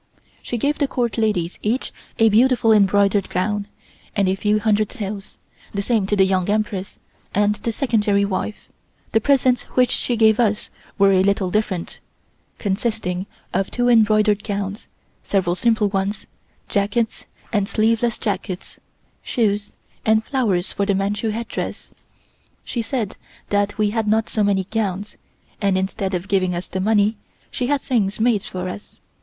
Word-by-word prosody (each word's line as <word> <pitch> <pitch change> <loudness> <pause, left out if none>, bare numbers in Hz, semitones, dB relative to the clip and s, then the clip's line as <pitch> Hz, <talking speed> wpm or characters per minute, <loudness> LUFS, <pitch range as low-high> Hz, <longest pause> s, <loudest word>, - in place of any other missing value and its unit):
She 240 - -3
gave 285 +6 0
the 285 - +2
Court 245 -3 -1
ladies 185 -6 0
each 230 +5 -1 0.2
a 225 0 +5
beautiful 230 +1 +4
embroidered 200 -1 +3
gown 205 +3 -1 0.5
and 200 -3 +2
a 185 - +2
few 210 +2 +1
hundred 215 -1 +1
taels, 200 -2 -6 0.4
the 200 - -1
same 215 -3 +1
to 205 - +1
the 190 -1 +5
Young 190 0 0
Empress 205 -2 -1 0.4
and 205 +1 +3
the 210 +2 -3
Secondary 210 -5 +1
wife. 200 +2 -4 0.4
The 225 - +3
presents 255 -1 +3 0.2
which 250 -1 +4
she 245 - 0
gave 220 0 +5
us 215 -3 +1 0.3
were 200 0 +5
a 185 -1 +4
little 195 -1 +1
different, 195 -4 -2 0.6
consisting 200 -3 -2 0.3
of 195 - 0
two 245 0 +1
embroidered 215 -2 +4
gowns, 200 0 -4 0.3
several 185 -3 0
simple 220 +1 +2
ones, 200 +1 -2 0.4
jackets 205 +3 -1 0.3
and 205 -1 +1
sleeveless 230 +1 +1
jackets, 195 -3 -4 0.4
shoes, 205 -4 -1 0.3
and 220 0 +3
flowers 210 -10 0
for 200 0 -1
the 200 - +2
Manchu 205 +3 -1
headdress. 230 +2 -5 0.7
She 240 - -3
said 225 -3 -3 0.3
that 205 0 0
we 210 -1 +2
had 225 -1 -1
not 220 +1 +2
so 215 - +1
many 200 -1 +2
gowns, 205 0 -3 0.4
and 200 -2 +2
instead 190 0 -2
of 180 +2 -4
giving 185 -3 +1
us 175 - -3
the 190 - -4
money, 210 +1 +2 0.3
she 250 - -2
had 285 0 +1
things 215 -6 0
made 225 -2 +3
for 185 0 -5
us. 205 +3 -8
210 Hz, 155 wpm, -21 LUFS, 195-225 Hz, 0.7 s, a